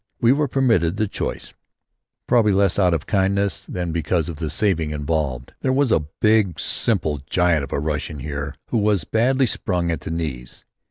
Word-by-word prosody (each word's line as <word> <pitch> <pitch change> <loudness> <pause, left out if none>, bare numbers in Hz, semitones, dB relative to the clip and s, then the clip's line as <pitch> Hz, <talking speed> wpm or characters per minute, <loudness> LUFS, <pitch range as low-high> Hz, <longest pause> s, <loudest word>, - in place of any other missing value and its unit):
We 120 - +4
were 145 +2 +2
permitted 115 - +2
the 110 - +1
choice, - - -5 0.7
probably 110 -4 +3
less 100 0 +2
out 90 -3 +4
of 75 - -3
kindness 100 -2 0
than 90 -2 -4
because 80 0 0
of 80 - -6
the 80 0 -3
saving 80 -1 +1
involved. 75 -4 -2
There 130 - +1
was 135 -2 +2
a - - +4 0.2
big 105 -6 +3
simple 80 -10 0
giant 90 -5 +2
of 70 - -7
a - - 0
Russian 75 +1 -3
here 70 +1 -5
who 115 - +1
was 105 -4 +2
badly 130 - +2
sprung 90 -6 -1
at 80 - -3
the - - -6
knees. 75 -7 -5
90 Hz, 180 wpm, -22 LUFS, 75-105 Hz, 0.7 s, We